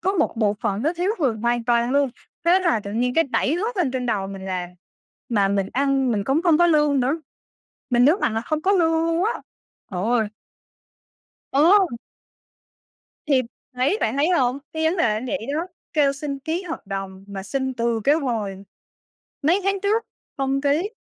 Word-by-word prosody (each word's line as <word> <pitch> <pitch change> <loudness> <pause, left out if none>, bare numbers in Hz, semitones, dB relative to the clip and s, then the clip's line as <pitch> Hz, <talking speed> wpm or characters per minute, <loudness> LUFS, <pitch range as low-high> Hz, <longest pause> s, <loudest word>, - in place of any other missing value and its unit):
có 380 +3 +1
một 325 -10 0
bộ 210 -2 +2
phận 200 +3 -1
nó 315 - +1
thiếu 355 +3 -1
người 270 -8 +1
hoàn 235 +1 0
toàn 235 0 +2
luôn, 280 -1 +2 0.3
thế 350 +2 +5
là 340 - +2
tự 200 0 -7
nhiên 250 +3 0
cái 330 - +4
đẩy 275 +1 0
hết 435 +6 -2
lên 345 -8 +1
trên 250 -1 -3
đầu 205 -5 0
mình 195 -1 -8
làm. 185 -2 -3 0.6
Mà 205 -5 +2
mình 195 -1 0
ăn 270 -1 +1
mình 205 -2 -1
cũng 275 +8 +1
không 335 -4 +4
có 345 - +5
lương 295 -4 +3
nữa, 275 +6 0 0.7
mình 245 0 +4
nhấn 295 +5 +6
mạnh 220 - 0
là 225 - 0
không 305 +6 -2
có 390 - +3
lương 335 -4 +3
luôn 330 +2 +1
á, 450 - +1 0.6
trời 180 -2 -3
ơi! 225 -2 +2 1.2
Ờ. 360 +8 +5 1.4
Thì, 275 -4 +3 0.3
thấy 260 +12 +1
bạn 225 +4 0
thấy 290 +4 +2
hông? 265 -7 +2
Cái 315 0 -2
vấn 320 +3 +2
đề 335 - +2
nó 215 +3 -3
vậy 265 -3 -3
đó, 325 +3 -1 0.3
kêu 290 -3 +3
xin 280 0 -5
ký 320 +6 -3
hợp 330 - -7
đồng 195 -1 -6
mà 195 -1 -6
xin 265 +4 -2
từ 235 -1 0
cái 285 - +5
hồi 220 -10 -2 0.8
mấy 335 +7 +3
tháng 395 0 +1
trước 430 +3 +1 0.3
không 270 0 0
ký, 295 +8 +1
275 Hz, 195 wpm, -23 LUFS, 230-325 Hz, 1.4 s, nhấn